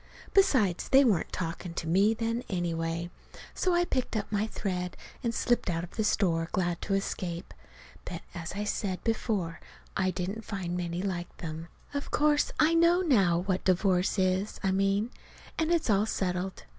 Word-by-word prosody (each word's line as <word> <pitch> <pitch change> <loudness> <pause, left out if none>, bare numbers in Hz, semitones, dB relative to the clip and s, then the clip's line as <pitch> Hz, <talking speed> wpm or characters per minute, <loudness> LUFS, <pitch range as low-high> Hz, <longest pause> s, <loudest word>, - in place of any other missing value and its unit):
Besides, 225 - +3
they 270 +1 +7
weren't 205 -9 +2
talking 170 0 -4
to 170 - -3
me 195 +7 +3
then, 230 +1 -1
anyway. 170 -2 -2 0.4
So 365 -2 +1
I 350 0 +3
picked 255 -7 -1
up 205 - -4
my 210 +1 +1
thread 180 -4 -3 0.3
and 235 - +1
slipped 240 -2 +1
out 165 -1 -1
of 175 - -8
the 220 - -1
store, 170 -5 +1
glad 175 -4 0
to 195 - 0
escape. 180 -2 -3 0.5
But, - - -6
as 170 -3 -5
I 205 +2 -2
said 200 -3 -2
before, 210 -7 -1 0.4
I 185 -1 +2
didn't 185 +5 -3
find 185 -5 -3
many 175 0 -2
like 175 -3 -4
them. 160 0 -6 0.3
Of 285 0 -3
course 295 0 +3
I 315 +2 +5
know 335 +2 +5
now 195 - +3
what 190 -2 0
divorce 185 +1 +2
is, 190 +2 +1
I 190 - +2
mean. 195 +4 +1 0.5
And 320 0 +1
it's 340 -2 +2
all 205 +2 +3
settled. 185 -2 -2
190 Hz, 170 wpm, -29 LUFS, 175-225 Hz, 0.5 s, they